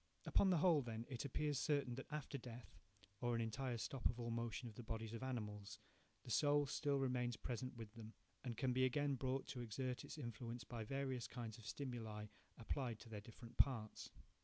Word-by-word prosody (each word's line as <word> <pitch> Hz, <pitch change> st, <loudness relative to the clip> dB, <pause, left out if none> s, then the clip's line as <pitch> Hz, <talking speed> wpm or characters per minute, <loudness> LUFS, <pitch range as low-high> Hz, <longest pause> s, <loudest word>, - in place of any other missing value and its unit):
Upon 195 Hz, -, +6 dB
the 180 Hz, -, +6 dB
whole, 160 Hz, -2 st, +6 dB
then, 115 Hz, -2 st, -3 dB
it 130 Hz, 0 st, -2 dB
appears 145 Hz, +1 st, +1 dB
certain 145 Hz, -5 st, +2 dB
that 135 Hz, +2 st, -5 dB
after 150 Hz, -1 st, -2 dB
death, 120 Hz, -1 st, -8 dB, 0.4 s
or 120 Hz, -1 st, +2 dB
an 115 Hz, -, +2 dB
entire 120 Hz, +2 st, 0 dB
stop 125 Hz, +3 st, +1 dB
of 120 Hz, -, -1 dB
all 120 Hz, -1 st, -1 dB
motion 115 Hz, +1 st, -1 dB
in 115 Hz, -, -7 dB
the 115 Hz, -, -6 dB
bodies 115 Hz, -1 st, -3 dB
of 115 Hz, -, -3 dB
animals, 105 Hz, -5 st, -3 dB, 0.5 s
the 120 Hz, -, -6 dB
soul 145 Hz, +3 st, +5 dB
still 140 Hz, +1 st, +2 dB
remains 125 Hz, -3 st, +1 dB
present 125 Hz, +1 st, -3 dB
with 110 Hz, -2 st, -6 dB
them, 115 Hz, -1 st, -8 dB, 0.3 s
and 120 Hz, -4 st, -2 dB
can 130 Hz, -2 st, +3 dB
be 130 Hz, +1 st, +4 dB
again 140 Hz, +2 st, +3 dB
brought 130 Hz, +1 st, 0 dB
to 125 Hz, -3 st, -3 dB
exert 125 Hz, +2 st, -1 dB
its -, -, -6 dB
influence 120 Hz, -2 st, -4 dB
by 115 Hz, -2 st, -4 dB
various 130 Hz, -1 st, -1 dB
kinds 115 Hz, -2 st, -5 dB
of 105 Hz, -, -9 dB
stimuli 110 Hz, -5 st, -3 dB, 0.3 s
applied 120 Hz, 0 st, -1 dB
to -, -, -10 dB
their 105 Hz, -2 st, -4 dB
different 115 Hz, +2 st, -11 dB
parts. 115 Hz, -6 st, +3 dB
120 Hz, 200 wpm, -44 LUFS, 115-135 Hz, 0.5 s, Upon